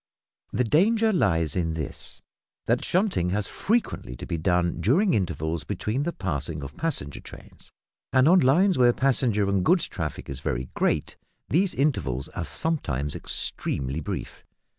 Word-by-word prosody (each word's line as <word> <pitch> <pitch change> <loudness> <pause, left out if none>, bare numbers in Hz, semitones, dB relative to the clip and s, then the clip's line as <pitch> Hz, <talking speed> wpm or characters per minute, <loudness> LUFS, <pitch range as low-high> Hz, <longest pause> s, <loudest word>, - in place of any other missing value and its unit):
The 125 - +1
danger 215 - +3
lies 85 - +1
in 80 -3 0
this, 75 -4 -7 0.4
that - - +1
shunting 180 - +1
has 105 0 0
frequently 220 - -1
to - - -8
be - - -3
done 85 +1 +1
during 165 - +3
intervals 80 -4 -1
between 105 - -2
the 170 - -1
passing 80 - -3
of 70 - -8
passenger 135 - -3
trains, - - -14 0.4
and, 130 +2 +5
on 185 +3 +7
lines 175 +5 +4
where 120 -1 +6
passenger 120 -7 +2
and 100 -2 +1
goods 180 - +3
traffic 80 -4 -5
is 70 -2 -5
very 65 -1 -3
great, - - 0 0.3
these 185 +5 +2
intervals 70 - 0
are 85 - -4
sometimes 75 - -2
extremely 70 +3 -2
brief. 75 - -6
100 Hz, 150 wpm, -26 LUFS, -, 0.4 s, on